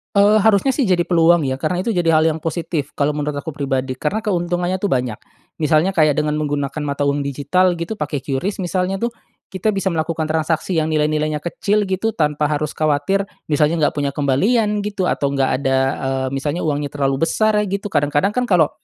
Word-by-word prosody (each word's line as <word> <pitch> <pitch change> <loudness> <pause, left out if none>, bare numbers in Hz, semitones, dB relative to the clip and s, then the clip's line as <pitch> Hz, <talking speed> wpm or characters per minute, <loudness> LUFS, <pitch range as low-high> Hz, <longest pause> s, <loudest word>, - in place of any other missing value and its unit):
Eee, 205 +2 +5
harusnya 220 +4 +4
sih 270 0 +1
jadi 185 -3 +2
peluang 170 -1 +4
ya 130 -2 -1
karena 180 +6 -1
itu 230 - -2
jadi 175 -6 +2
hal 155 - +5
yang 160 - -2
positif 160 -2 -3
kalo 150 +1 0
menurut 150 0 -2
aku 145 +3 -5
pribadi 135 -3 -2
karena 180 +11 -1
keuntungannya 175 -2 -1
tuh 190 - -3
banyak, 125 - -1 0.4
misalnya 155 +3 +2
kayak 155 -6 +3
dengan 150 +1 0
menggunakan 145 0 -2
mata 140 0 -3
uang 140 0 0
digital 150 +7 +1
gitu 170 +6 -5
pakai 150 -4 -3
QRIS 140 +10 -3
misalnya 185 +1 -1
tuh, 235 - +1 0.4
kita 195 +3 -1
bisa 195 -1 0
melakukan 160 -1 -2
transaksi 160 +2 0
yang 155 0 0
nilai-nilainya 150 0 0
kecil 200 +5 0
gitu 205 +4 -1
tanpa 150 -2 0
harus 150 0 -2
khawatir 155 +6 +1 0.2
misalnya 155 +2 +2
enggak 145 - +2
punya 140 -1 0
kembalian 205 - +1
gitu 200 -3 -1
atau 140 0 0
enggak 135 -1 +1
ada, 135 -1 +1 0.3
eee, 135 0 -1
misalnya 145 +5 -2
uangnya 145 -2 -2
terlalu 135 +1 +1
besar 215 +5 +1
gitu, 200 +1 -3
kadang-kadang 145 +2 +1
kan 250 - +2
kalau, 180 -9 +3
155 Hz, 190 wpm, -19 LUFS, 145-185 Hz, 0.4 s, Eee